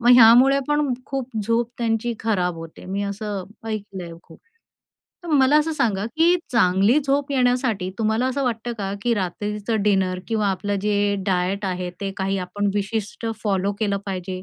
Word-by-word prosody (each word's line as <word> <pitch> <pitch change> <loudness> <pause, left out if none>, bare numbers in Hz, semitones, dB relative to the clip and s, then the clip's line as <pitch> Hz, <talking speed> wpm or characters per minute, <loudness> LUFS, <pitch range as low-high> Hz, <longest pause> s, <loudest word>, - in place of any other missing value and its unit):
मग 240 +1 +4
ह्यामुळे 250 +4 +7
पण 295 -2 +1
खूप 270 -2 -3
झोप 230 +2 0
त्यांची 230 0 0
खराब 180 -6 0
होते. 165 0 -10
मी 195 +2 -2
असं 200 -1 -4 0.2
ऐकलंय 195 -5 -5
खूप. 165 - -16 0.9
तर - - -7
मला 280 0 +5
असं 320 +1 0
सांगा, 210 -9 0
की 330 +8 +3 0.2
चांगली 205 +3 +4
झोप 280 +1 +1
येण्यासाठी 245 -7 +1
तुम्हाला 220 +3 +1
असं 270 +1 -1
वाटतं 235 0 -2
का, 195 -1 -3
की 240 +1 +1
रात्रीचं 210 +3 -2
डिनर 190 -3 +1
किंवा 215 -3 +1
आपलं 200 +2 -2
जे 205 -1 +1
डायट 190 +2 0
आहे 180 -1 -2
ते 195 -1 -2
काही 195 0 -1
आपण 200 +3 -2
विशिष्ट 205 +2 -3 0.2
फॉलो 200 -1 0
केलं 200 -2 +1
पाहिजे? 185 -1 -4
210 Hz, 160 wpm, -22 LUFS, 195-240 Hz, 0.9 s, ह्यामुळे